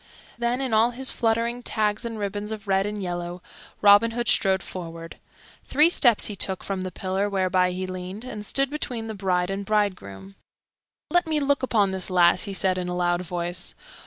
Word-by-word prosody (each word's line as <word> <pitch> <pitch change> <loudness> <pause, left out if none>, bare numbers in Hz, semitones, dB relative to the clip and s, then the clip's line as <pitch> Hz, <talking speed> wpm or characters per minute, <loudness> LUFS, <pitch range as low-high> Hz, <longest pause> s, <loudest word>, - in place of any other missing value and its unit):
Then, 240 +2 -1
in 260 -4 -2
all 220 +2 +5
his 260 +2 -2
fluttering 235 +1 0
tags 215 -1 -1
and 230 -1 -4
ribbons 205 +1 -4
of 215 -1 -7
red 195 +1 +2
and 210 -1 -4
yellow, 175 0 -5 0.4
Robin 205 +2 +7
Hood 240 -1 -1
strode 190 -1 +2
forward. 165 -2 -8 0.5
Three 305 +5 +4
steps 240 -10 +4
he 210 - -4
took 190 -1 -3
from 195 -2 -3
the 185 0 -4
pillar 190 +3 -2
whereby 185 -2 +2
he 185 +1 -3
leaned, 185 +4 -7
and 215 -5 -6
stood 275 +6 -1
between 245 -6 -3
the 220 - -5
bride 185 -2 0
and 195 +1 -3
bridegroom. 195 - -2 0.8
"Let 350 -1 +2
me 310 -1 +1
look 285 0 +1
upon 215 -7 +2
this 190 0 -1
lass," 180 +1 +4
he 200 - -5
said 185 +1 +1
in 180 -1 -3
a 180 - -3
loud 175 0 +1
voice. 175 0 -3
200 Hz, 190 wpm, -25 LUFS, 185-230 Hz, 0.8 s, Robin